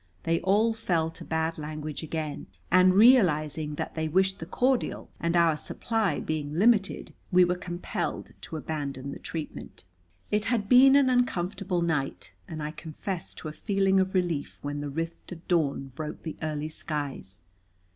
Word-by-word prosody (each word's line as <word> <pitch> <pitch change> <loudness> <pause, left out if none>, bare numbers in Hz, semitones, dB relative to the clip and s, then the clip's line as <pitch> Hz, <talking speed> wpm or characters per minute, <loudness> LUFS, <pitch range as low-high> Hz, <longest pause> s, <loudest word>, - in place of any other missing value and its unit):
They 165 0 +1
all 210 +4 +3
fell 170 -8 0
to - - -10
bad 160 0 -1
language 150 -1 -5
again, 155 -2 -4 0.2
and, 185 +1 +6
realizing 160 - +4
that - - -4
they 160 -1 -2
wished 190 +4 +2
the 165 - -7
cordial, 255 +4 0
and 170 +1 0
our 170 -2 +4
supply 225 +6 -1
being 150 -1 -3
limited, 205 +1 +2 0.2
we 180 0 +6
were 175 - +1
compelled 175 0 -4
to 160 - -6
abandon 140 -2 -4
the - - -7
treatment. 160 -2 -7 0.5
It 210 0 +1
had 225 -3 0
been 265 +3 +7
an 280 -2 +5
uncomfortable 190 -6 0
night, 135 - -2 0.2
and 155 -1 -5
I 150 - -3
confess 165 +3 -6
to - - -7
a - - -4
feeling 195 0 +2
of 190 0 0
relief 175 -5 -1
when 145 0 -3
"the 145 - -4
rift 165 +5 -5
of 165 0 -13
dawn" 140 -6 0
broke 150 +2 -6
the 160 - -5
early 155 -1 -2
skies. 140 - -5
165 Hz, 165 wpm, -28 LUFS, 150-190 Hz, 0.5 s, been